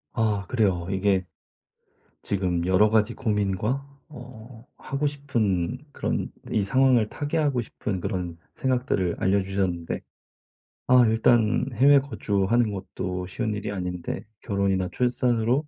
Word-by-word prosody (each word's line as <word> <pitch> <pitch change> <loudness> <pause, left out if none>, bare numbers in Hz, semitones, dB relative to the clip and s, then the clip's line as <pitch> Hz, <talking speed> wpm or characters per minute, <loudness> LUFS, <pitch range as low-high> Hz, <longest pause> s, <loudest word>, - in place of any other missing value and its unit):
아 105 -3 0
그래요. 95 -8 +1
이게 95 -1 +1 1.0
지금 90 -4 -1
여러 95 +3 +4
가지 110 +1 +2
고민과 105 +3 -1 0.2
어 120 -4 -12
하고 140 +2 -2
싶은 120 -8 -1
그런 - - -2 0.2
이 105 - +1
상황을 125 0 +3
타개하고 145 -2 0
싶은 105 -4 -4
그런 90 -3 -3 0.2
생각들을 125 -9 0
알려주셨는데 95 -3 0 0.9
아 125 -1 +6
일단 110 +1 +3
해외 140 +5 +6
거주하는 115 -4 0
것도 90 -2 -5
쉬운 110 +4 -2
일이 105 -1 -4
아닌데 90 -3 -4 0.2
결혼이나 95 -2 0
출산으로 125 +2 +1
105 Hz, 270 characters per minute, -25 LUFS, 95-125 Hz, 1.0 s, 아